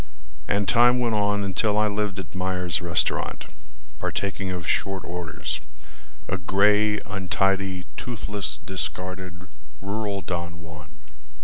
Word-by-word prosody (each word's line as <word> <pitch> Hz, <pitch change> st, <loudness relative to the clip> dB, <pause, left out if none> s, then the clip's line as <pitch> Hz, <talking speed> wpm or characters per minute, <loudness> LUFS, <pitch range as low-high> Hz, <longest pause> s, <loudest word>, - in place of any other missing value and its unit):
And 100 Hz, 0 st, +1 dB
time 120 Hz, +1 st, +6 dB
went 120 Hz, -2 st, +1 dB
on 100 Hz, -1 st, +2 dB
until 105 Hz, +2 st, +1 dB
I 105 Hz, 0 st, +4 dB
lived 105 Hz, -1 st, -1 dB
at 95 Hz, -3 st, -6 dB
Mayer's 90 Hz, -2 st, 0 dB
restaurant, 85 Hz, -1 st, +1 dB, 0.5 s
Partaking 95 Hz, -1 st, -2 dB
of 90 Hz, -2 st, -4 dB
short 95 Hz, -2 st, 0 dB
orders, 85 Hz, -3 st, -3 dB, 0.7 s
a 95 Hz, -, -1 dB
gray, 105 Hz, +3 st, +4 dB
untidy, 95 Hz, -1 st, 0 dB
Toothless, 105 Hz, -4 st, -2 dB
discarded, 95 Hz, -1 st, -3 dB, 0.3 s
rural 100 Hz, 0 st, -2 dB
Don 85 Hz, -2 st, -4 dB
Juan. 80 Hz, -3 st, -11 dB
95 Hz, 115 wpm, -26 LUFS, 90-105 Hz, 0.7 s, time